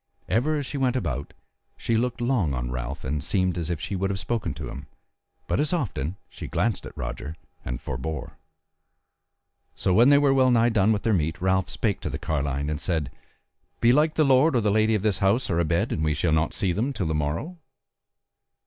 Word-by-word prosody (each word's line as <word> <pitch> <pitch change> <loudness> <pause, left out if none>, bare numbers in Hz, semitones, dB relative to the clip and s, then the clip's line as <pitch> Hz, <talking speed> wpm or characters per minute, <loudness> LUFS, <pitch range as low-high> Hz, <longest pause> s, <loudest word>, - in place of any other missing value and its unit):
Ever 150 +7 +1
as 145 - -3
she 140 - -4
went 130 -1 +1
about 70 - -3 0.5
she 115 - -1
looked 120 +1 -1
long 115 - +1
on - - -3
Ralph, 65 +2 -5
and 70 +1 -2
seemed 95 -3 0
as 85 -2 -3
if 85 -3 -2
she 100 +4 -4
would 95 +1 -1
have 100 - -2
spoken 105 -5 -2
to - - -6
him, 70 +1 -8 0.6
but - - -1
as 150 +3 +1
often, 100 - -2
she - - -8
glanced 115 -2 -1
at - - -13
Roger 65 +5 -5 0.3
and - - -4
forbore. 70 +3 -5 1.4
So 95 - +1
when 120 +7 +6
they 145 - +7
were 140 -1 +4
well 130 -1 +4
nigh 120 -1 +4
done 110 -2 +3
with 105 -2 0
their 115 - +2
meat 80 -3 0
Ralph 95 0 +1
spake 105 -5 -1
to - - -4
the - - -3
carline 70 -2 -2
and 75 -1 -2
said: 80 -7 -1 0.7
"Belike 150 +7 +4
the 155 - +4
lord 135 +2 +4
or 120 - +3
the 105 -1 +2
lady 110 +1 +3
of 105 - -1
this 105 -3 +1
house 100 +3 +2
are 85 - +1
abed 85 0 +1
and 80 - -1
we 75 -1 +1
shall 85 - +1
not 80 +1 +1
see 95 - +1
them 120 +10 -1
till 95 - -2
the 80 - -1
morrow?" 80 - -2
95 Hz, 210 wpm, -25 LUFS, 80-120 Hz, 1.4 s, they